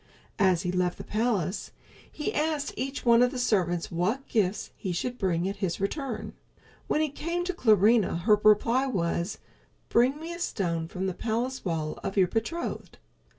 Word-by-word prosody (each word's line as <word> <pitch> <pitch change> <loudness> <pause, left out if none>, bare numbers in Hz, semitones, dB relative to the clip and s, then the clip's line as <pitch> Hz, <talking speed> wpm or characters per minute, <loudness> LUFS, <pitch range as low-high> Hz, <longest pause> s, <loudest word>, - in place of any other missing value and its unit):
As 185 -2 +3
he 180 - -1
left 180 -1 0
the - - -7
palace 215 -5 -1 0.4
he 300 - -3
asked 300 -1 -1
each 270 +1 -4
one 235 0 +6
of 250 - +5
the 255 - -6
servants 180 -8 +1
what 190 +11 -1
gifts 210 -3 0
he 185 - -4
should 245 +8 -3
bring 180 -2 0
at 200 +1 -3
his 190 -4 -2
return. 245 +5 -3 0.5
When 305 - +1
he 310 - +1
came 335 +5 -3
to 370 +1 -2
Clarinha, 215 - +4
her 210 +2 +4
reply 230 +5 +4
was, 170 -4 -1 0.5
"Bring 255 +5 +3
me 330 +2 -6
a 340 - -7
stone 170 - -1
from 185 +3 -4
the 190 - -1
palace 240 +6 -2
wall 160 -4 -2
of 195 - -4
your 185 -2 +5
betrothed." 230 - -3
215 Hz, 175 wpm, -28 LUFS, 180-260 Hz, 0.5 s, one